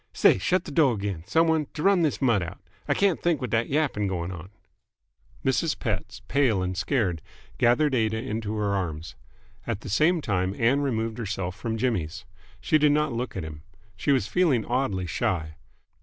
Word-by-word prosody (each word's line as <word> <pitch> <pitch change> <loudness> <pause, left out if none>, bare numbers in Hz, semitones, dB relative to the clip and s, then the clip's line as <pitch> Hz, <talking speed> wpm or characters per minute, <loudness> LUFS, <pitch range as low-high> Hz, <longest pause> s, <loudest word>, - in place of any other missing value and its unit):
"Say, - - +4
shut 185 - +1
th't - - -7
door 140 -9 +3
'gain, 100 -5 -4
some 165 +1 +3
one, 160 0 +3
and 150 -2 -5
t'run 190 +4 +3
this 150 -3 0
mutt 115 -6 +3
out. 85 -1 -6 0.3
I - - +2
can't 195 -4 +2
think 170 -3 +1
with 125 -4 -4
th't 115 0 +1
yapping 135 -9 0
going 90 -2 -3
on." 90 0 -8 1.0
Mrs. 135 +4 +1
Pett, 105 -8 -4
pale 120 -9 +2
and 90 0 -2
scared, 95 - 0 0.4
gathered 135 +5 +3
Aida 110 -3 +1
into 110 -2 -3
her 105 -2 0
arms. 80 -5 -3 0.5
At 100 - -2
the - - -8
same 155 - +3
time 95 -7 -1
Ann 125 +5 +2
removed 115 -4 -2
herself 95 -5 -3
from 115 +3 -3
Jimmy's. 105 -10 -2 0.3
She 155 - +2
did 150 -1 +4
not 150 -3 +1
look 120 -2 -4
at 90 - -3
him. 75 -2 -8 0.3
She 90 +10 0
was 130 -7 +2
feeling 135 - +2
oddly 120 -7 -1
shy. 85 -4 -2
115 Hz, 185 wpm, -26 LUFS, 95-140 Hz, 1.0 s, Say